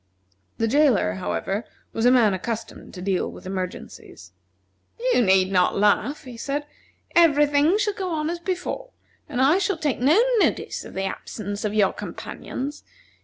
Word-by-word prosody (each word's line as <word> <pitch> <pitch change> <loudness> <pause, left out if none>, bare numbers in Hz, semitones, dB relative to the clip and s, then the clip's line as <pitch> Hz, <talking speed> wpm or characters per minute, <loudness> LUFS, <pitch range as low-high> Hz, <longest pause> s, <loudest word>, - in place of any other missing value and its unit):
The 225 - +1
jailer, 255 - +3
however, 95 - -3 0.3
was 225 +2 +2
a - - +6
man 230 -6 +4
accustomed 225 +4 -5
to 180 - -7
deal 190 -1 0
with - - -12
emergencies. 185 -1 -7 0.8
"You - - +4
need 190 -3 +3
not 180 -2 +2
laugh," 210 +9 +2
he 250 -4 -10
said, 285 +5 -3 0.5
"every 300 -4 +6
thing 295 +6 +3
shall 415 -1 0
go 385 -3 -4
on 310 -2 -1
as 345 - -4
before, 370 +8 -4 0.4
and 260 -4 -3
I 290 +8 +4
shall 395 -2 0
take 300 -6 -1
no 290 - +4 0.2
notice - - 0
of - - -11
the 190 - -2
absence 205 +1 -5
of 210 0 -2
your 200 -3 +3
companions. 280 +3 -6
250 Hz, 165 wpm, -24 LUFS, 195-305 Hz, 0.8 s, a